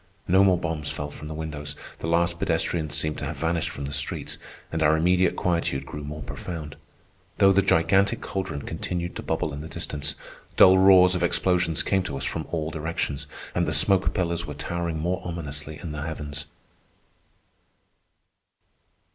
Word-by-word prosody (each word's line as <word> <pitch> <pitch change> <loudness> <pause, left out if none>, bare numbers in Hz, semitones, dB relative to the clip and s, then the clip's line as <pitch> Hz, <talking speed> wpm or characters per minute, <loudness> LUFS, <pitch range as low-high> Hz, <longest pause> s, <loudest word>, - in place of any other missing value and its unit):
No 95 +2 +5
more 95 -2 +4
bombs 80 -3 -3
fell 75 0 -4
from 75 +1 -9
the 80 - -6
windows, 75 -2 -5 0.2
the - - -4
last 85 +1 +2
pedestrians 80 -2 0
seemed 75 +1 -1
to - - -4
have 75 +2 -5
vanished 80 +2 0
from 70 - -6
the 70 - -5
streets, 70 -1 -3 0.3
and 80 - -2
our 80 0 +4
immediate 90 +2 +3
quietude 85 -6 0
grew 75 - -7
more 75 +2 -6
profound; 80 -4 -6 0.6
though 95 - +6
the 100 +1 +4
gigantic 95 +2 +3
caldron 95 -7 -4
continued 85 -1 -4
to - - -4
bubble 75 - -2
in 70 - -5
the 80 - -7
distance, 70 -3 -2 0.4
dull 95 0 +8
roars 95 -1 +7
of 90 - -1
explosions 90 -1 +2
came 95 -1 +2
to 70 -7 -4
us - - -3
from - - -3
all 80 -2 -2
directions, 75 -3 -3 0.3
and 85 -1 +1
the - - 0
smoke 95 +6 +5
pillars 85 -2 -1
were - - -6
towering 85 -2 -3
more 90 +4 -1
ominously 75 -3 -5
in 85 - -6
the 75 -1 -5
heavens. 75 -1 -5
80 Hz, 170 wpm, -25 LUFS, 75-90 Hz, 0.6 s, dull